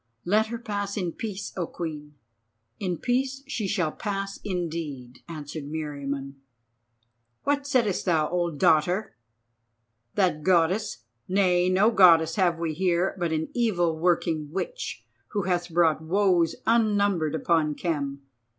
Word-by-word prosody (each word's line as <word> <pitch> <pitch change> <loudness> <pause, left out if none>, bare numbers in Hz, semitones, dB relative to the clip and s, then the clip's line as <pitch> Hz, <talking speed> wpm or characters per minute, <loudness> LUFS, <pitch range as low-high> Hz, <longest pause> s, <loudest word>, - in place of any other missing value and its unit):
"Let 215 +5 +3
her 235 +1 -4
pass 205 -3 -4
in 180 -4 -1
peace, 205 +1 -6
O 175 -3 -2
Queen." 150 -3 -6 0.6
"In 180 -3 -2
peace 265 - -1
she 230 -6 -3
shall 180 -6 0
pass 195 0 -4
indeed," 160 -9 -4
answered 155 -2 -6
Meriamun. 140 -2 -5 1.1
"What 285 0 0
saidest 235 -9 +1
thou, 160 -4 +2
old 170 -3 -1
dotard? 165 +8 +3 1.0
That 175 -6 +2
Goddess! 185 - +1 0.2
Nay, 180 -2 +3
no 195 +5 +4
Goddess 170 -6 +6
have 175 -4 +2
we 165 -1 -2
here, 180 +2 +1
but 170 -2 0
an 160 0 -1
evil 180 -9 +1
working 160 -2 0
witch, 480 - -4 0.3
who 205 -2 0
hath 180 -1 -1
brought 165 -2 +3
woes 175 0 +2
unnumbered 205 -8 +2
upon 160 -2 +1
Khem. 140 -5 -3
175 Hz, 130 wpm, -26 LUFS, 160-200 Hz, 1.1 s, Goddess